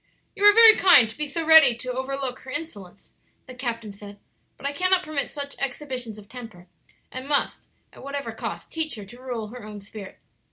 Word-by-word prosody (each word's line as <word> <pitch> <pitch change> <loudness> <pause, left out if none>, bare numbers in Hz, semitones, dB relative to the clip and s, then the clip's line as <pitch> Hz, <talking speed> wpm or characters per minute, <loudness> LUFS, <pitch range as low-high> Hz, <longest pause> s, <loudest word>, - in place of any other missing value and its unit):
"You 400 - -5
are 415 - +9
very 450 -1 +9
kind 310 -11 +6
to 220 - -10
be 300 0 -3
so 320 +4 -4
ready 320 -6 +7
to 250 +2 -6
over 260 +2 -4
look 265 -2 -5
her 260 - -13
insolence," 230 - -8 0.3
the 255 - -11
captain 230 -4 -5
said; 200 0 -12 0.4
"but - - -12
I 280 - -1
cannot 365 +4 +2
permit 305 -4 -3
such 285 -1 -7
exhibitions 255 -4 -5
of 205 -1 -14
temper, 225 -7 -11 0.5
and 255 +2 -8
must, 285 - -1 0.3
at - - -14
whatever 280 +1 -5
cost, - - -7
teach 320 -3 -3
her 210 -2 -9
to 240 +6 -15
rule 240 -5 -5
her 245 +1 -11
own 210 -1 -9
spirit." 200 0 -11
255 Hz, 205 wpm, -24 LUFS, 220-295 Hz, 0.5 s, are